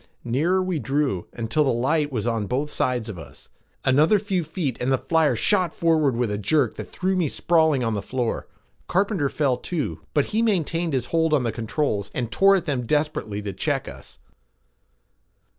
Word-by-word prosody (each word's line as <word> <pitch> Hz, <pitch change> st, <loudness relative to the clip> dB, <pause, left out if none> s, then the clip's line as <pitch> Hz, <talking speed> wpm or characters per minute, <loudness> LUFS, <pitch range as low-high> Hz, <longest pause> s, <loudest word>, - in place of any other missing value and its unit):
Nearer 165 Hz, +11 st, +1 dB
we 185 Hz, -4 st, -1 dB
drew 135 Hz, -10 st, -1 dB
until 120 Hz, +6 st, 0 dB
the 140 Hz, -, +1 dB
light 145 Hz, +5 st, +1 dB
was 115 Hz, -5 st, -2 dB
on 115 Hz, -3 st, -1 dB
both 140 Hz, +6 st, -2 dB
sides 125 Hz, -3 st, -1 dB
of 100 Hz, -6 st, -6 dB
us. 65 Hz, -5 st, -12 dB, 0.4 s
Another 150 Hz, +10 st, +4 dB
few 195 Hz, -3 st, -1 dB
feet 150 Hz, -6 st, -3 dB
and 125 Hz, +2 st, 0 dB
the 130 Hz, -, +3 dB
flyer 160 Hz, -2 st, +2 dB
shot 180 Hz, -, +1 dB
forward 155 Hz, -6 st, +2 dB
with 120 Hz, -3 st, 0 dB
a 105 Hz, -, -2 dB
jerk 125 Hz, +4 st, +1 dB
that -, -, -7 dB
threw 190 Hz, +1 st, -1 dB
me 175 Hz, -5 st, +1 dB
sprawling 160 Hz, -6 st, +2 dB
on 115 Hz, -1 st, 0 dB
the 100 Hz, -, -2 dB
floor. 120 Hz, +2 st, -3 dB, 0.4 s
Carpenter 190 Hz, -6 st, +1 dB
fell 135 Hz, -4 st, 0 dB
too, 170 Hz, -5 st, -3 dB, 0.2 s
but 145 Hz, -, +3 dB
he 220 Hz, -, +2 dB
maintained 170 Hz, -6 st, 0 dB
his 130 Hz, -3 st, 0 dB
hold 160 Hz, -2 st, +3 dB
on 135 Hz, -, +1 dB
the 115 Hz, -, 0 dB
controls 110 Hz, -2 st, -2 dB
and 120 Hz, -3 st, -2 dB
tore 195 Hz, +6 st, +5 dB
at 185 Hz, -, -1 dB
them 125 Hz, -5 st, -2 dB
desperately 145 Hz, -9 st, -1 dB
to 100 Hz, -1 st, -4 dB
check -, -, -1 dB
us. -, -, -10 dB
145 Hz, 190 wpm, -24 LUFS, 120-165 Hz, 0.4 s, tore